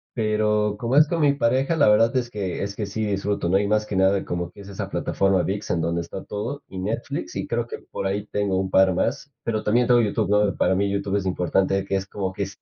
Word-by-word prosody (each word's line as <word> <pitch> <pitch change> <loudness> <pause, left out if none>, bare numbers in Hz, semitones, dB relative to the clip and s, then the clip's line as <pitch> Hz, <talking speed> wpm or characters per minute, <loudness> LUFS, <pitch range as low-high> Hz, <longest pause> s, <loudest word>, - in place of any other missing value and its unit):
Pero 105 -1 +1
como 120 +3 -1
es 150 +1 +7
con 165 -1 -1
mi 145 -1 +4
pareja, 135 +4 +1
la 145 -7 +4
verdad 115 +4 +4
es 120 -1 -1
que 100 -5 -4
es 100 0 -4
que 105 - -3
sí 110 +2 -3
disfruto, 100 -3 -1
¿no? 95 - +4
Y 100 - +1
más 105 0 +1
que 100 - -4
nada 95 +1 +3
como 90 0 -4
es 100 -1 -12
esa 100 - -5
plataforma 95 -1 +1
Vix 100 +4 -3
en 85 -2 0
donde 85 +1 -1
está 85 +3 -7
todo, 115 +8 -5
y 95 - -9
Netflix, 100 +5 -4
y - - -3
creo - - -1
que - - -7
por - - -4
ahí 100 +2 -2
tengo 100 -3 0
un 95 - -2
par 95 0 +4
más, 140 +9 -2
pero 110 -2 -1
también 120 +3 +2
tengo 120 -1 +5
YouTube, 105 -2 0
¿no? 105 -1 +3
Para 95 - +2
mí 100 +2 +1
YouTube 100 0 -1
es 100 - -1
importante 95 +1 +1
que 100 0 -2
es 95 - -1
como 95 -1 -4
que 100 +1 -3
es 95 0 -8
100 Hz, 255 wpm, -23 LUFS, 95-110 Hz, -, es